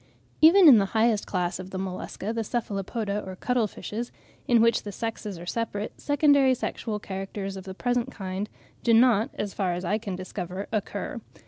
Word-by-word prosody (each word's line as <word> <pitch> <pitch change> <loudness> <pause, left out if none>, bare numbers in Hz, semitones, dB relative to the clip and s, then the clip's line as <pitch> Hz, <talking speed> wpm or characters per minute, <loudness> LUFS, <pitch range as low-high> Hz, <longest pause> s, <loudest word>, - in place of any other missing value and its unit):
Even 340 +3 +8
in 250 -7 +9
the 195 - +1
highest 220 -2 +2
class 180 -1 -1
of 185 0 -7
the 190 - -5
Mollusca, 190 +3 -4
the 230 -1 -1
Cephalopoda 210 -1 -2
or 190 -1 -7
cuttle 245 +2 0
fishes, 230 +4 -6 0.4
in 240 -2 +5
which 230 0 +4
the 205 - -6
sexes 215 -2 -4
are 170 - -9
separate, 210 +1 -3
secondary 285 -2 +4
sexual 220 -2 -3
characters 195 0 -5
of 190 0 -8
the 190 -1 -7
present 245 +3 0
kind 195 0 -4 0.3
do 230 -1 +4
not, 230 -2 +5
as 205 -1 -3
far 185 -3 0
as 180 +1 -4
I 210 +5 +1
can 205 -4 -4
discover, 185 +1 -5
occur. 210 -2 -3
210 Hz, 185 wpm, -26 LUFS, 190-235 Hz, 0.4 s, in